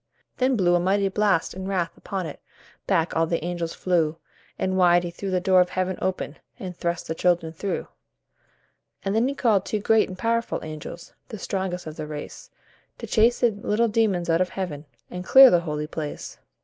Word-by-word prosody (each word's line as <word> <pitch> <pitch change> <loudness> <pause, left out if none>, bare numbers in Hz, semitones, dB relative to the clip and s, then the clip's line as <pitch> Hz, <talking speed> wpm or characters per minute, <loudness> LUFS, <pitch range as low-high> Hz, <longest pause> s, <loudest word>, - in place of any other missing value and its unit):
Then 260 0 +2
blew 180 -5 +3
a 175 - +4
mighty 195 +2 +1
blast 195 -4 +1
in 190 +1 -6
wrath 180 -4 -1
upon 190 -2 -4
it; 155 - -7 0.5
Back 170 -4 +1
all 165 0 +2
the 165 0 -2
angels 170 -1 -3
flew, 165 -3 +1 0.4
And 185 0 -1
wide 175 -1 +4
he 175 - -4
threw 195 +3 -5
the 185 -1 +1
door 185 0 +4
of 180 - +1
heaven 185 0 -2
open, 185 -5 -2 0.2
And 185 -7 -7
thrust 170 0 -2
the 160 - -2
children 170 -1 +1
through. 195 +4 -3 1.2
And 195 - 0
then 225 +3 +2
he 280 - -2
called 215 -8 +2
two 215 - -2
great 220 +1 +3
and 185 - -8
powerful 230 +2 0
angels, 155 +2 -8
The 220 - -7
strongest 190 -2 -3
of 155 -1 -8
the 155 -1 -5
race, 150 -1 -8 0.5
To - - -7
chase 230 +2 +3
the 240 -2 +4
little 210 +2 0
demons 210 -6 +1
out 165 +1 +2
of 185 - +1
Heaven, 160 -6 -5 0.3
And 180 0 -5
clear 265 +6 +9
the 175 - +5
holy 150 -3 -3
place. 150 -1 -6
185 Hz, 200 wpm, -24 LUFS, 170-200 Hz, 1.2 s, clear